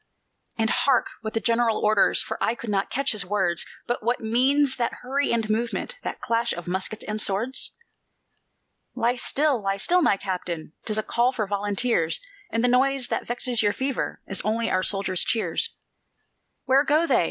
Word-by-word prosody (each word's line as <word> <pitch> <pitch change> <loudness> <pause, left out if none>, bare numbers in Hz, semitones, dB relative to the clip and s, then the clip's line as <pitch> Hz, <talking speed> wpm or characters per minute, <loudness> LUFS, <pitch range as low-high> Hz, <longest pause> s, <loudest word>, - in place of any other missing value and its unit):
"And 225 0 +1
hark 270 -3 +2
what 220 0 -5
the - - +2
General 230 -1 +2
orders, 210 -1 +3
For - - -4
I 230 - +1
could 235 -2 -6
not 195 -1 0
catch 275 +1 0
his 215 -3 -2
words; 180 -2 +1 0.2
But 240 - -2
what 240 +3 0
means 265 +5 +2
that 240 0 -2
hurry 275 +3 0
and 225 -2 0
movement, 235 - -2
That - - -5
clash 235 +1 0
of 175 0 -7
muskets 190 +4 -3
and 215 0 -1
swords?" 225 +7 0 1.2
"Lie 235 +1 +2
still, 270 +1 +1
lie 195 0 -1
still, 355 - +3
my 205 - +3
Captain, 175 -5 -4
'Tis 215 -1 -1
a 215 - 0
call 240 +3 +2
for 230 -5 -2
volunteers; 205 -2 0 0.3
And 230 +1 -1
the - - +4
noise 260 +1 +2
that - - -2
vexes 245 0 0
your 205 -1 +2
fever 265 0 -2
Is 195 - -1
only 225 +2 0
our 185 - +2
soldiers' 190 -2 0
cheers." 225 -1 0 1.0
"Where 270 +2 +4
go 310 +3 +3
they?" - - +3
230 Hz, 180 wpm, -25 LUFS, 205-250 Hz, 1.2 s, the